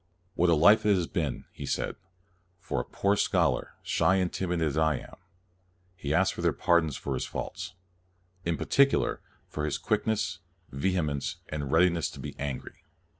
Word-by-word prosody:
" 90 +1 -41
What 90 -1 +2
a 85 - +5
life 105 +8 +6
it 105 -1 +4
has 90 -2 0
been,' 80 -6 -2
1 - - -24
he - - -7
said, - - -1 0.3
" 90 -1 -40
for - - 0
a - - -9
poor 100 +1 +1
scholar, - - +1
shy 95 - +2
and 95 -2 0
timid 90 -2 -1
as 75 -4 0
I 80 -1 +3
am.'' - - -12 0.8
He 75 -6 -4
asked 95 +5 +3
their - - +2
pardon 85 -2 +3
for 70 -1 -4
his 65 - -2
faults, 90 - -5 0.3
" 90 0 -39
in 85 -2 -1
particular 140 0 +2 0.3
for 75 - -4
his 75 -2 -1
quickness, 95 -5 0 0.3
vehemence, 75 -1 -1
and 70 -3 -4
readiness 85 -2 +3
to - - -11
be - - -6
angry." 70 -2 -5
85 Hz, 180 wpm, -28 LUFS, 75-95 Hz, 0.8 s, life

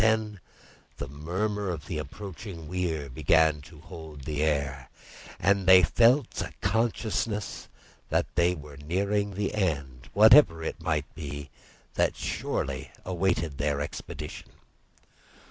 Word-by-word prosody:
Then 110 -2 +2 0.6
the 70 - -5
murmur 95 +8 -2
of 80 -5 -4
the - - -3
approaching 95 -4 -8
weir 85 -4 -2
began 75 +3 +3
to 75 +1 -14
hold 80 -3 -10
the 75 +2 -3
air, 70 -3 -1 0.5
and 100 +1 +2
they 95 -1 +9
felt 120 - +3
a - - -4
consciousness 105 -1 -1 0.4
that - - +2
they 85 +1 +3
were 75 -3 -11
nearing 100 +6 -1
the 100 0 -1
end, 70 - -2
whatever 110 - +7
it - - -4
might 75 -2 -1
be, 75 -3 -7 0.4
that - - +1
surely - - -3 0.2
awaited 85 -5 0
their 70 -1 0
expedition. 75 +1 -6
85 Hz, 125 wpm, -28 LUFS, 75-100 Hz, 0.6 s, they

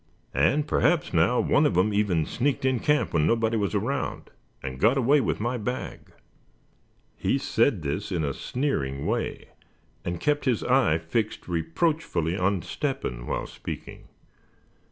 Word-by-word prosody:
And 135 - +2
perhaps 160 - +2
now, 85 +9 +3
one 145 - +3
of 90 - -1
'em 105 +3 +3
even 95 -6 +1
sneaked 135 +2 -1
in 130 -2 +2
camp 150 +3 +1
when 80 -2 +3
nobody 115 +1 +2
was 100 -5 0
around, - - -2 0.3
and 65 -1 -5
got 115 +6 +4
away 135 +3 +4
with 110 - -1
my 120 +3 -1
bag." 125 +4 -5 1.0
He - - 0
said 115 - +1
this 95 +9 -3
in 85 -4 0
a 70 -2 -1
sneering 70 - -2
way, - - -2 0.5
and 85 -1 -3
kept 145 -1 0
his 125 -5 +1
eye 125 -11 +3
fixed 95 +7 -2
reproachfully 85 - 0
on 95 -1 0
Step 135 -2 -3
hen - - -5
while - - -2
speaking. - - -8
110 Hz, 155 wpm, -26 LUFS, 80-135 Hz, 1.0 s, got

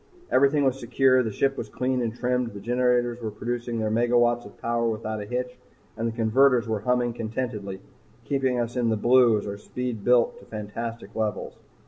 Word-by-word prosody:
Everything 140 +2 +4
was 135 -1 +1
secure, 130 +1 +3
the 110 -3 -2
ship 135 +6 +1
was - - -5
clean 130 0 -1
and 115 -1 -2
trimmed, 125 0 0
the - - -6
generators 120 +1 +1
were 110 - -3
producing 120 +2 -4
their 110 -1 -1
megawatts 120 0 +2
of 100 - -17
power 115 0 0
without 110 -1 -3
a 105 - -7
hitch, 125 +1 -4 0.4
and 115 +1 -2
the - - -1
converters 120 +2 +3
were 110 -1 -1
humming 120 +2 0
contentedly, 110 -4 -4 0.5
keeping 130 -3 0
us 120 +1 -2
in 120 -2 +1
the 110 - +1
blue 120 0 +5
as 105 - -4
our 100 0 -5
speed 125 -1 -5
built 125 0 +3
to - - -16
fantastic 115 +2 -6
levels. 110 -2 -3
120 Hz, 190 wpm, -25 LUFS, 110-125 Hz, 0.5 s, blue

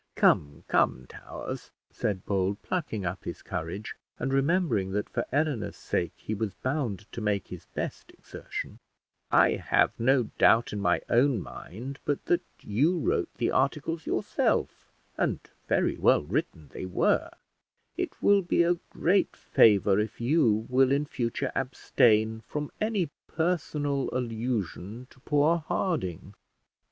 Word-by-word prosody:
"Come, 75 -1 +2
come, 65 - +2
Towers," - - -7 0.2
said 95 -3 -2
Bold, 100 0 0
plucking 125 - -2
up 90 +2 -3
his - - -7
courage, 85 +7 -5 0.2
and 135 +2 -2
remembering 135 - +1
that 105 +1 -1
for - - -3
Eleanor's 145 -7 0
sake - - -2
he 110 - -5
was 105 -2 -3
bound 125 - -2
to 115 - -6
make 105 -2 -1
his 90 -3 -9
best - - -4
exertion; - - -7 0.5
"I - - +5
have - - +2
no 130 +2 +4 0.2
doubt 115 +2 +5
in 105 - -2
my 100 - +2
own 125 0 +3
mind 125 +9 -8
but 145 - -2
that 175 0 +2 0.2
you 145 - +1
wrote 160 - 0
the - - 0
articles 150 +4 0
yourself, - - 0 0.3
and - - 0 0.3
very - - +1
well - - +4
written 85 - -3
they 95 - -6
were: 90 - +2 0.7
it - - -4
will 200 -1 +6
be 175 -1 +2
a 175 0 +2
great 190 +3 +1
favour 100 -2 +4
if 110 +1 -3
you 120 -4 +2
will 130 +1 +3
in 140 +2 +2
future 130 0 -2
abstain 110 -4 +2
from 150 -1 -4
any 210 -7 0 0.2
personal 150 -5 -1
allusion 115 -3 -3
to - - -19
poor 150 +4 +2
Harding." 105 - -2
125 Hz, 140 wpm, -28 LUFS, 105-150 Hz, 0.7 s, will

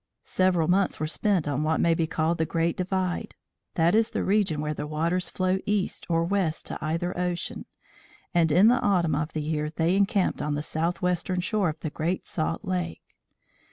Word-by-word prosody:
Several 180 -4 +2
months 190 +2 +2
were 155 - 0
spent 175 +1 0
on 145 0 0
what 155 +1 +1
may 170 - +3
be 165 0 0
called 160 +1 0
the 160 - +2
Great 165 0 0
Divide 185 -1 -2 0.4
that 170 +1 +3
is 220 +1 +3
the - - -2
region 195 -6 +1
where 150 0 -2
the 150 - -5
waters 165 +4 -1
flow 185 0 0
east 205 -2 -1
or 165 0 +2
west 175 -3 -1
to - - -5
either 165 +3 -1
ocean, 180 -1 -3 0.7
and 165 -2 +3
in 185 +8 +6
the 245 +2 +4
autumn 175 -6 +2
of 150 +2 -2
the 155 - -2
year 150 0 -1
they 165 +3 +1
encamped 195 -1 +1
on 150 0 -1
the 145 - -3
southwestern 175 +3 -1
shore 195 0 +1
of 155 0 -6
the 155 - -3
Great 170 +5 -2
Salt 165 +4 -2
Lake. 180 -3 -3
170 Hz, 190 wpm, -26 LUFS, 155-185 Hz, 0.7 s, in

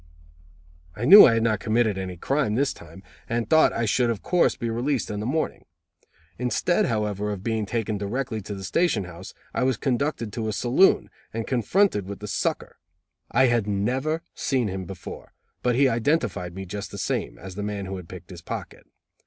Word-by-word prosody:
I 115 - -3
knew 200 +9 +11
I 115 - +3
had 115 - +1
not 110 -3 +1
committed 110 -1 +1
any 95 -2 -5
crime 135 - 0
this 140 +2 +1
time 85 +4 -14 0.3
and 115 0 -1
thought 160 0 +5
I 115 - -1
should 120 +3 +2
of 115 -3 -3
course 180 -1 +2
be 115 - -4
released 120 +3 -1
in 105 - -3
the 105 - -3
morning. 155 +4 -2 0.8
Instead 125 +8 +1
however 105 -2 -1
of 100 -2 -6
being 110 -2 -1
taken 110 -2 -2
directly 110 +2 -3
to 100 +1 -6
the 95 - -8
station 120 - +1
house, 90 +1 -10 0.2
I - - -1
was 130 -1 +2
conducted 130 -4 -1
to 115 -2 -3
a 110 - -1
saloon, 125 - +3 0.2
and 115 -1 -2
confronted 125 - +1
with 100 0 -6
the 105 - -8
"sucker". - - -2 0.5
I 130 +3 +4
had 120 -4 +2
never 130 +11 -1
seen 125 -6 0
him 95 0 -4
before, 90 -1 -9 0.3
but 125 -1 +1
he 135 +2 +5
identified 115 - 0
me, 95 0 -6
just 100 +2 -6
the - - -8
same, - - -2
as 95 +5 -9
the 105 - -5
man 105 -1 -3
who 95 0 -5
had 90 -3 -10
picked - - -10
his - - -9
pocket. - - -7
115 Hz, 195 wpm, -25 LUFS, 100-130 Hz, 0.8 s, knew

